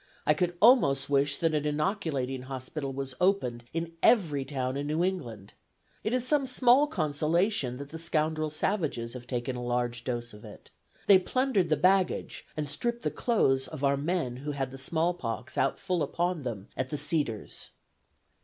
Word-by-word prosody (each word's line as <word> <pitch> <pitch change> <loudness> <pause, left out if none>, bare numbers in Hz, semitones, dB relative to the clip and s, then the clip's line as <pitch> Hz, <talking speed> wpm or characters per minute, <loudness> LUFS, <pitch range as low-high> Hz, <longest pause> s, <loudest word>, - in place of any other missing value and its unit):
I 150 - +5
could 175 +2 -1
almost 140 - +5
wish 140 0 +3
that 165 -1 0
an 150 -1 +1
inoculating 150 -5 -1
hospital 135 +2 -5
was 135 0 -5
opened 125 -11 +1
in 165 0 -3
every 160 - +4
town 130 -2 -3
in 140 +1 -3
New 155 +3 0
England. 120 - -4 0.5
It 215 - -1
is 250 0 +1
some 275 0 +2
small 255 +3 +4
consolation 155 - 0
that 140 +1 -8
the 160 - -7
scoundrel 155 -1 0
savages 155 - -2
have 125 -1 -9
taken 125 0 -2
a 125 - -5
large 120 0 -1
dose 120 -2 -4
of 105 - -13
it. - - -13 0.3
They 195 -2 +7
plundered 215 -3 +1
the 155 - +3
baggage 185 +4 +1
and 150 -1 -2
stripped 235 +12 -2
off - - -19
the - - 0
clothes 135 - +1
of 150 -3 -8
our 140 0 +4
men 145 -4 -1
who 145 +3 -4
had 135 -2 -3
the 135 - -9
small 165 +5 0
pox 115 - -5
out - - +1
full 180 -2 -1
upon 175 +1 -1
them 115 -6 -5
at 130 0 -2
the 150 - -3
Cedars." 140 - -2
150 Hz, 180 wpm, -29 LUFS, 130-180 Hz, 0.5 s, They